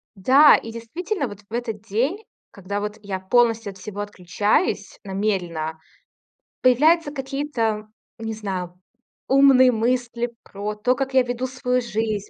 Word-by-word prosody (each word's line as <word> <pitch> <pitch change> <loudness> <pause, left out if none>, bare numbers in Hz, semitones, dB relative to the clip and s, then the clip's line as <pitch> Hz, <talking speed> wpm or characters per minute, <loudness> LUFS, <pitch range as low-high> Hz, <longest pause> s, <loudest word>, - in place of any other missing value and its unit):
Да, 265 +10 +7
и 225 - -8
действительно, 290 - -4
вот 205 -3 -10
в - - -14
этот 230 -4 -3
день, 255 - -1 0.3
когда 200 +1 -5
вот 210 +1 -4
я 195 -2 -4
полностью 225 +1 +2
от 190 - -15
всего 205 +2 -6
отключаюсь 205 - -1
намеренно, 180 -6 -2 0.8
появляются 295 +5 +4
какие-то, 265 -6 -2 0.3
не 225 -1 -4
знаю, 185 -4 -5 0.5
умные 265 -2 +6
мысли 240 +1 -1
про 205 +1 -5
то, 245 +5 +1
как 270 -1 -3
я 260 -1 +5
веду 245 +1 -3
свою 250 -1 -1
жизнь, 215 -3 -2
225 Hz, 135 wpm, -23 LUFS, 205-255 Hz, 0.8 s, Да